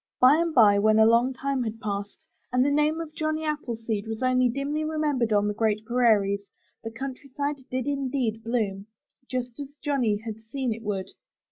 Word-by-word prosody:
By 260 +4 +7
and 335 0 +1
by, 210 -7 +6
when 215 +1 +4
a 220 - +7
long 235 +3 +4
time 270 +1 -2
had 225 -1 -4
passed, 205 -1 -5 0.3
and 250 +1 +3
the 285 - +2
name 300 +2 +2
of 320 -2 -6
Johnny 310 0 -2
Appleseed 230 -8 -3
was 225 +2 -4
only 255 -1 +3
dimly 280 +5 -2
remembered 300 -7 0
on 205 -1 +3
the 210 - 0
great 215 0 0
prairies, 205 -5 +2 0.3
the 225 - -4
countryside 275 +4 -4
did 255 -1 -2
indeed 260 -5 -1
bloom, 210 -4 -2 0.4
just 250 -1 -4
as 285 0 -7
Johnny 265 -8 0
had 220 -2 -5
seen 245 +2 -2
it 225 - -9
would. 200 -3 -3
245 Hz, 180 wpm, -26 LUFS, 220-280 Hz, 0.4 s, By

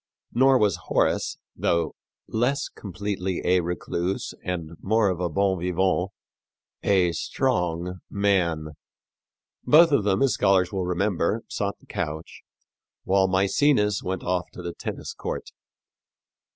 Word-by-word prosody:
Nor 130 +2 +5
was 105 -5 +2
Horace, - - +1 0.2
though 85 -1 0 0.3
less 125 +6 0
completely 95 -1 -4
a 90 +1 +4
recluse 90 +1 -2
and 85 -3 -3
more 110 0 +2
of 90 -2 -2
a 90 -1 0
bon 95 +3 +1
vivant, 90 +1 +1 0.7
a 95 -3 +3
strong 85 +2 -1
man. 90 -6 +1 0.9
Both 160 +6 +6
of 140 -7 +3
them, 100 +3 +2
as 135 -5 +3
scholars 95 -2 +3
will 95 -2 -1
remember, 95 +3 0
sought 100 -1 -3
the - - -23
couch, 80 +2 -5 0.6
while 95 0 +3
Mæcenas 105 +3 +2
went 95 0 -3
off 90 0 -1
to 90 - -9
the 85 -1 -4
tennis - - -6
court. - - -5
95 Hz, 125 wpm, -25 LUFS, 90-100 Hz, 0.9 s, Both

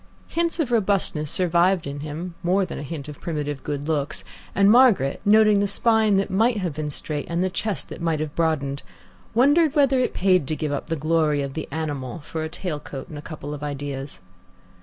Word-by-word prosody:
Hints 335 0 -1
of 280 -7 0
robustness 195 -9 +1
survived 180 +1 +2
in 140 0 -5
him, 155 +4 -5
more 185 +3 +2
than 175 - -6
a - - -5
hint 145 0 -6
of 150 -1 -10
primitive 145 -4 -3
good 145 0 -4
looks, 150 -3 -1 0.3
and 200 +1 +5
Margaret, 230 - +4
noting 215 0 +6
the 200 - +2
spine 220 -1 +3
that 195 0 0
might 225 +4 +3
have 180 -6 -2
been 150 0 -3
straight, 150 0 -3
and 170 +2 0
the 185 - 0
chest 210 +2 -3
that - - -8
might 165 -2 0
have 155 -1 -3
broadened, 140 -4 0 0.5
wondered 290 +5 +4
whether 275 -3 +4
it 255 - 0
paid 185 -6 +3
to 155 - -1
give 155 -1 -3
up 145 - -3
the 165 - -1
glory 155 -1 +1
of 135 -1 -5
the 160 - -5
animal 145 -6 -4
for 160 +2 -5
a 160 - -3
tail 160 -2 -4
coat 135 -2 -8
and 150 - -8
a - - -7
couple 150 -1 -7
of 145 - -7
ideas. 140 -3 -5
160 Hz, 210 wpm, -24 LUFS, 145-200 Hz, 0.5 s, noting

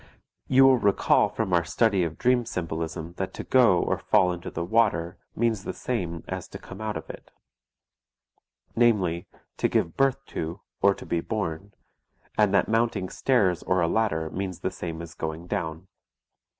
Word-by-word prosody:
You 135 0 +6
will 130 -2 +6
recall 100 -2 +3
from 95 - -2
our 85 -1 +4
study 95 +3 +2
of 80 -2 -3
dream 125 0 +3
symbolism 80 -4 -4
that 95 - -4
to - - -5
go 120 -8 +5
or - - -1
fall 90 -1 +3
into 90 0 -6
the 85 - -4
water 90 -5 +1 0.2
means 110 -4 0
the - - -4
same 85 -9 -3
as - - -5
to - - -9
come 95 +3 -11
out 110 -1 -2
of - - -8
it, - - -10 1.5
namely, 95 -7 +2 0.3
to - - +2
give 80 - 0
birth 135 0 +1
to, 85 +4 -4 0.2
or 100 0 +5
to - - -10
be 85 - -1
born, 100 -2 -4 0.6
and 105 -2 +3
that 100 - +3
mounting 115 -4 0
stairs 100 - +1
or 90 - +1
a 85 - +2
ladder 85 -6 0
means 95 -2 -4
the - - -1
same 85 -1 -6
as 85 0 -10
going 80 +1 -5
down. 80 0 -4
95 Hz, 175 wpm, -26 LUFS, 85-110 Hz, 1.5 s, You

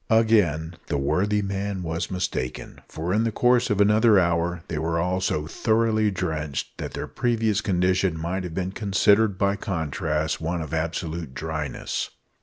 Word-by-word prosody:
Again 95 -8 +3
the - - -1
worthy 95 +10 +1
man 100 -1 -3
was 80 +1 -3
mistaken; 90 -9 -4
for, 85 +3 -3
in 110 +2 +2
the 115 - 0
course 125 +2 +3
of 105 - +1
another 105 +1 +5
hour, 85 -1 0
they 75 - -3
were 80 +1 -1
all 90 +2 0
so 75 -5 0
thoroughly 110 +4 +1
drenched, 80 -7 -3
that - - -5
their - - -3
previous 110 -3 0
condition 90 -3 +1
might 90 +3 -2
have 85 -2 -6
been 95 0 -2
considered, 100 0 +3
by 100 +1 +1
contrast, 80 -4 -2
one 85 +1 -2
of 80 0 -8
absolute 80 -2 -3
dryness. 80 -3 -3
90 Hz, 160 wpm, -25 LUFS, 80-105 Hz, -, another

